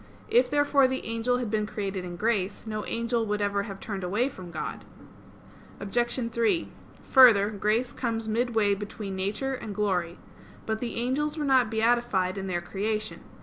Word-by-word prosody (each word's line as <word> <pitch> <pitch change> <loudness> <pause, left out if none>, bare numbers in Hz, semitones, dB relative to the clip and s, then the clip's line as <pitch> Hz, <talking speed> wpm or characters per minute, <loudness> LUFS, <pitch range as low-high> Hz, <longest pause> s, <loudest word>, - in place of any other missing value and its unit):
If, 470 +3 +4
therefore, 290 -2 +4
the 260 0 -3
angel 230 +2 0
had 240 -4 -3
been 215 -1 0
created 195 -3 -4
in 175 -1 -6
grace, 205 0 -1
no 215 -1 -3
angel 230 0 0
would 210 0 -1
ever 200 -1 0
have 195 0 -7
turned 200 -4 -5
away 210 +9 +1
from 185 -8 -10
God. 160 -2 -5 1.0
Obj. 235 +4 -1
3: 235 +9 +1 0.4
Further, 220 -6 +7
grace 215 +4 0
comes 225 -3 -2
midway 220 -2 +2
between 200 0 -5
nature 205 +8 -2
and 220 -5 -6
glory. 180 -5 0 0.5
But 220 0 -2
the 240 0 -4
angels 285 +6 -1
were 300 - -1
not 260 -4 +4
beatified 220 -4 +1
in 195 - -4
their 175 -2 -1
creation. 210 +4 -3
220 Hz, 165 wpm, -27 LUFS, 200-245 Hz, 1.0 s, Further